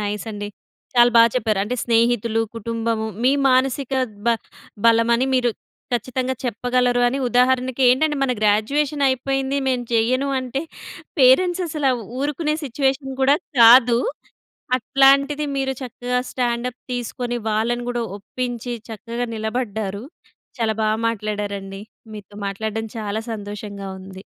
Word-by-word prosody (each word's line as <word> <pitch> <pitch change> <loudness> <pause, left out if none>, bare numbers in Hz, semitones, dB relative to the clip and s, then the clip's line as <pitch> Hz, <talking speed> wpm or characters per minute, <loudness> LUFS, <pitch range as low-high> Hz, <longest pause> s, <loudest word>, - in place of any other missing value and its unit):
Nice 210 +1 -3
అండి. 205 -1 -5 0.5
చాలా 240 0 +6
బాగా 230 0 +8
చెప్పారు. 215 -4 0
అంటే 230 +5 -2
స్నేహితులు, 230 -1 +2 0.2
కుటుంబము 230 0 -2 0.2
మీ 255 - +5 0.2
మానసిక 260 +1 +1 0.3
బ - - +4 0.6
బలమని 230 +2 +4
మీరు, 245 -2 +2 0.4
ఖచ్చితంగా 255 +2 -1
చెప్పగలరు 245 +1 +1
అని 270 +3 -2
ఉదాహరణకి 255 +1 +2
ఏంటంటే 295 +4 +3
మన 260 -2 +2
గ్రాడ్యుయేషన్ 275 +8 +1
అయిపోయింది, 270 +1 -1
మేము 250 -2 0
చేయను 255 +5 +2
అంటే 260 +1 -3 0.6
పేరెంట్స్ 350 +8 +5
అసల 300 -3 -2 0.3
ఊరుకునే 300 +2 -1
సిట్యుయేషన్ 270 +1 -1
కూడా 275 +2 +5 0.2
కాదు. 235 +1 +8 0.8
అట్లాంటిది, 275 +4 +3
మీరు 265 0 0
చక్కగా 250 0 -3
స్టాండ్ 240 -1 -1
అప్ 250 - -26
తీసుకొని 245 0 -3
వాళ్ళను 235 +3 0
కూడా 240 -1 -2 0.2
ఒప్పించి 245 +2 -4 0.2
చక్కగా 230 +3 -4
నిలబడ్డారు. 220 -3 -3 0.6
చాలా 220 -1 0
బాగా 215 0 +1
మాట్లాడారండి 205 -2 -4 0.3
మీతో 205 -1 -11
మాట్లాడడం 220 +2 -3
చాలా 215 0 -3
సంతోషంగా 205 -1 -7
ఉంది. 190 0 -11
240 Hz, 120 wpm, -21 LUFS, 220-260 Hz, 0.8 s, బాగా